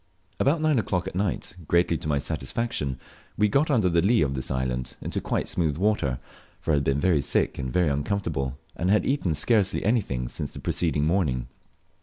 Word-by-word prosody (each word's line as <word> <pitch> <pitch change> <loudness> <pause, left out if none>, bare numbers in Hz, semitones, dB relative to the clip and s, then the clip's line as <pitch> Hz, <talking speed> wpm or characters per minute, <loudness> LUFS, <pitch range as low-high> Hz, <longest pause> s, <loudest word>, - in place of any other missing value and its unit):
About 155 +4 +2
nine 155 -5 +3
o'clock 90 -4 -1
at - - -5
night, 95 -1 -1
greatly 85 -1 +3
to - - -6
my 75 -2 +1
satisfaction, 75 - -2 0.4
we 105 - +4
got 140 +9 +2
under 115 -10 +3
the 85 -1 +3
lea 100 -1 +4
of 70 -2 -1
this 65 -1 -4
island, 65 -1 -2
into - - -3
quite - - -1
smooth 80 -5 0
water 95 -10 +1 0.4
for 80 - -1
I - - +4
had 70 - +1
been 70 +1 +1
very 80 -2 +3
sick - - 0
and 65 -2 -4
uncomfortable, 75 -4 0 0.2
and 90 +3 -1
had 105 +2 +3
eaten 115 - +1
scarcely 100 +4 +2
anything 95 - 0
since - - -5
the - - -7
preceding 75 -4 0
morning. 75 -8 0
85 Hz, 190 wpm, -26 LUFS, 70-105 Hz, 0.4 s, we